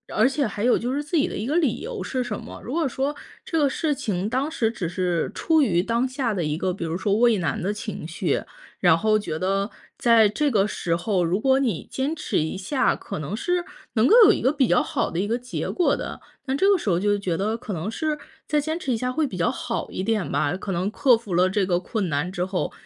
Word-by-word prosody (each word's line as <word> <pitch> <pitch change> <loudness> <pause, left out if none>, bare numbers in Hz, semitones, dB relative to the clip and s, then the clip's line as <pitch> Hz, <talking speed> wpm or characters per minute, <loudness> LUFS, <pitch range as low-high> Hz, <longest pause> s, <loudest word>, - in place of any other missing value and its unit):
而 220 +4 +5
且 275 0 0
还 205 0 -5
有 245 - +4
就 245 +3 -2
是 290 +2 -1
自 320 +3 -1
己 290 - +3
的 - - -5
一 210 - -3
个 295 +7 +1
理 295 -10 +1
由 465 0 -5
是 255 -1 -2
什 230 -4 -4
么， - - -10
如 240 - -6
果 325 -4 +1
说 270 +3 -1 0.3
这 325 - -1
个 285 -2 +3
事 310 +2 0
情 205 -6 -2
当 260 +5 0
时 230 -8 0
只 190 -8 -4
是 175 -1 -1
出 320 -1 +3
于 180 -10 +2
当 235 +4 +1
下 255 -4 -1
的 185 - -1
一 150 0 -1
个， 185 +2 -1
比 175 -2 -5
如 165 +1 -2
说 200 +1 0
畏 235 -2 +4
难 160 -5 -1
的 195 +4 -1
情 210 -6 -6
绪， 165 - -1 0.4
然 175 -3 +5
后 215 +4 +2
觉 160 -7 -4
得 195 +4 0 0.3
在 230 -3 +5
这 290 +8 +1
个 205 -6 +3
时 170 -5 -1
候， 185 +1 0
如 180 +5 0
果 265 +1 +4
你 230 - -1
坚 280 +5 -1
持 310 - -2
一 155 +3 -2
下， 255 +9 +1
可 - - -6
能 155 +7 -4
是， 355 +8 -1 0.3
能 225 +2 +4
够 440 - +6
有 410 - +8
一 - - -1
个 260 - +2
比 275 -4 +3
较 175 - +4
好 - - -1
的 170 - -2
一 200 - 0
个 230 +3 0
结 250 0 -4
果 355 - +2
的， - - -6 0.2
但 265 -1 -1
这 390 +6 +4
个 400 - +5
时 220 - -3
候 170 - +3
就 205 +2 +2
觉 185 -4 -1
得 210 +5 -1
可 230 -3 -6
能 175 +5 -3
是 305 +4 -1 0.3
再 300 -1 +2
坚 315 +3 -3
持 265 -7 -1
一 - - 0
下 250 +2 -1
会 305 +3 0
比 200 - -7
较 180 +6 +1
好 245 -2 -4
一 - - -3
点 210 -1 -1
吧， 150 +5 +1
可 195 +1 -5
能 185 +2 0
克 245 +2 +4
服 220 -5 -7
了 180 +2 +4
这 195 0 +1
个 180 -2 +1
困 205 +1 -2
难 155 +3 -1
之 180 -1 -2
后， 185 -1 -2
220 Hz, 285 characters per minute, -24 LUFS, 185-270 Hz, 0.4 s, 有